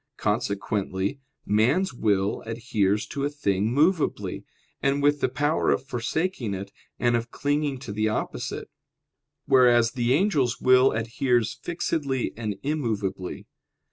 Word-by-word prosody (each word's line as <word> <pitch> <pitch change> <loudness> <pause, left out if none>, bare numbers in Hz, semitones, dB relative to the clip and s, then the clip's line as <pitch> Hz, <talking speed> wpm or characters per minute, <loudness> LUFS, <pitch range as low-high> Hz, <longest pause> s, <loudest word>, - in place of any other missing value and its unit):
Consequently 100 0 -1 0.3
man's 125 - +2
will 100 -4 0
adheres 110 -3 0
to 140 - -4
a 145 - +1
thing 105 -7 0
movably, 155 +5 +1 0.4
and 140 +1 +1
with 145 0 +3
the - - +2
power 145 +4 +1
of - - +1
forsaking 125 - -2
it 95 +1 -7 0.3
and 120 -1 +2
of 115 0 -2
clinging 145 +1 -1
to 125 -4 -8
the 110 +1 0
opposite; 110 - -4 0.7
whereas 120 -3 +5
the 125 0 +1
angel's 145 - +1
will 130 +1 +5
adheres 115 +1 0
fixedly 145 -6 -2
and 110 -3 -3
immovably. 110 -11 -2
120 Hz, 125 wpm, -25 LUFS, 105-140 Hz, 0.7 s, whereas